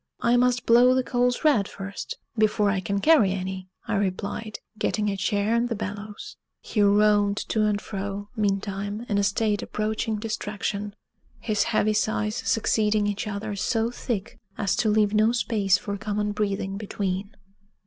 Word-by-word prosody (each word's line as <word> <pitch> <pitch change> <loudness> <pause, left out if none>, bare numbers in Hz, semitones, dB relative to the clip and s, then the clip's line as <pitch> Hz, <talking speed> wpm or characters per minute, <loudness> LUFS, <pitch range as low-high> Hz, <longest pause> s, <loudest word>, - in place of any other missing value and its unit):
"I 235 +1 +3
must 250 0 +2
blow 245 +2 +6
the 260 - +2
coals 245 +1 0
red 270 -11 +4
first, 200 0 -7 0.2
before 215 -2 +2
I 195 - 0
can 200 +2 -2
carry 275 -11 +5
any," 185 0 -5 0.2
I 225 - -1
replied, 200 +2 -3 0.2
getting 210 -1 0
a - - -2
chair 205 +3 0
and 235 +1 +1
the 230 - -1
bellows. 210 - -7 0.2
He 215 - -1
roamed 205 0 +4
to 215 -1 +2
and 205 -1 +1
fro, 200 0 -5
meantime, 205 +1 -2
in 205 -2 +1
a - - +2
state 210 +1 +1
approaching 215 +1 -2
distraction, 210 -1 -3 0.4
his 215 -3 0
heavy 215 +1 +2
sighs 215 +1 0
succeeding 215 -1 +1
each 205 +1 -2
other 205 0 -4
so 225 +4 0
thick 230 -3 -4 0.2
as 200 -2 0
to 220 - +2
leave 210 -1 +3
no 215 +2 +4
space 210 -5 +2
for 200 +1 -4
common 210 +1 -2
breathing 200 -2 -2
between. 200 -1 -3
210 Hz, 160 wpm, -25 LUFS, 200-220 Hz, 0.4 s, blow